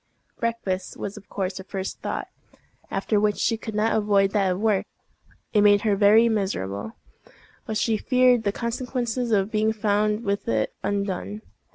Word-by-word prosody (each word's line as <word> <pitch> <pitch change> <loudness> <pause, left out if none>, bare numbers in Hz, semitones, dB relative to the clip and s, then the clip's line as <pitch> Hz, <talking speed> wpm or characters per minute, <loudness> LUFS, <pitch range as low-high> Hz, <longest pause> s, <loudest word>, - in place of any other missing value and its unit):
Breakfast 215 -6 -2
was 200 - -5
of 210 -2 -13
course 190 -1 -3
her - - -7
first 195 0 -5
thought, - - -3 0.6
after 210 - 0
which 210 0 +1
she 225 - +1
could 220 -1 -7
not 215 +2 +2
avoid 200 -2 +3
that 195 -3 +2
of 180 - -5
work. 215 -2 +1 0.7
It 210 - +5
made 205 0 +5
her 210 -3 +2
very 215 +3 +6
miserable, 110 - -2 0.7
but 220 - -1
she 225 -1 +1
feared 250 0 +3
the 205 -2 0
consequences 245 +1 -2
of 200 0 +2
being 215 0 +2
found 210 0 0
with 200 -1 -2
it 110 -1 0
undone. 200 +1 -2
210 Hz, 165 wpm, -24 LUFS, 195-225 Hz, 0.7 s, very